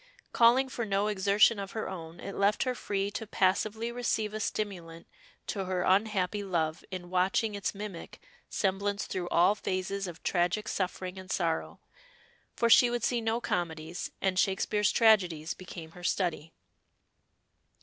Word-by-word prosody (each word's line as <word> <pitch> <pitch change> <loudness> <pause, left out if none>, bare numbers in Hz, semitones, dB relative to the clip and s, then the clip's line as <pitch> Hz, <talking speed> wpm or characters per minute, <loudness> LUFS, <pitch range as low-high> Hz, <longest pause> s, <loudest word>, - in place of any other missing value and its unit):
Calling 245 +3 +5
for 255 -2 -4
no 200 -1 0
exertion 205 +1 +3
of 195 0 -6
her 220 - -3
own, 165 -2 -8
it 200 - -6
left 200 +1 +2
her 255 - 0
free 200 -4 -2
to 220 +1 -5
passively 215 +5 +1
receive 225 -3 -1
a 215 - -3
stimulant 180 -6 -4 0.4
to 195 -2 -3
her 185 -1 -1
unhappy 205 0 +1
love 165 -4 -1
in 180 -2 -7
watching 190 +4 +1
its 200 0 -3
mimic 200 -4 -7 0.3
semblance 200 +1 -1
through 180 -2 -4
all 175 +4 +4
phases 195 -1 -3
of 175 -1 -9
tragic 175 +4 0
suffering 185 0 -3
and 185 0 -11
sorrow, 165 -3 -1 0.8
for 235 - +2
she 240 +1 +7
would 240 -1 -2
see 240 -2 +1
no 225 +1 0
comedies, 170 -4 -3
and 185 -1 +1
Shakespeare's 205 +2 +2
tragedies 180 -8 +3
became 170 -3 -10
her 175 +1 -13
study. 170 -4 -1
195 Hz, 150 wpm, -30 LUFS, 180-215 Hz, 0.8 s, she